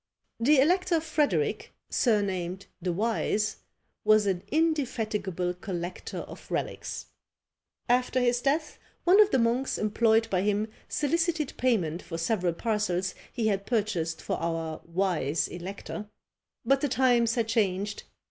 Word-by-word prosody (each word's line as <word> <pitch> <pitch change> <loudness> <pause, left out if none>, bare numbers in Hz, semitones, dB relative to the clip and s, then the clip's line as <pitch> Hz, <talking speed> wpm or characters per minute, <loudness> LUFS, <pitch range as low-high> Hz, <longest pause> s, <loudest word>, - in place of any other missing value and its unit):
The 280 +6 +5
elector 350 +3 +3
Frederic, 315 +7 0 0.2
surnamed 190 -5 0 0.2
the 180 0 -1
Wise, 215 +2 0 0.5
was 215 0 +5
an 190 -3 0
indefatigable 225 - 0
collector 180 -1 -5
of - - -11
relics. - - -3 0.8
After 250 +1 +2
his 245 -1 +2
death, 300 +3 0 0.2
one 380 +4 +7
of 420 - +5
the - - +2
monks 240 +2 +1
employed 220 +1 +3
by 185 -2 +2
him 210 +2 0 0.2
solicited 320 0 0
payment 185 -10 +1
for 165 - -6
several 175 0 0
parcels 190 -3 -1 0.2
he 235 -3 -2
had 200 -2 0
purchased 200 -8 -1
for - - -1
our 165 -1 -3
wise 170 -4 0
elector; 200 +4 -7 0.6
but 275 0 +3
the 290 - +1
times 240 -3 +3
had 230 -2 0
changed! 205 -2 0
215 Hz, 130 wpm, -28 LUFS, 185-255 Hz, 0.8 s, one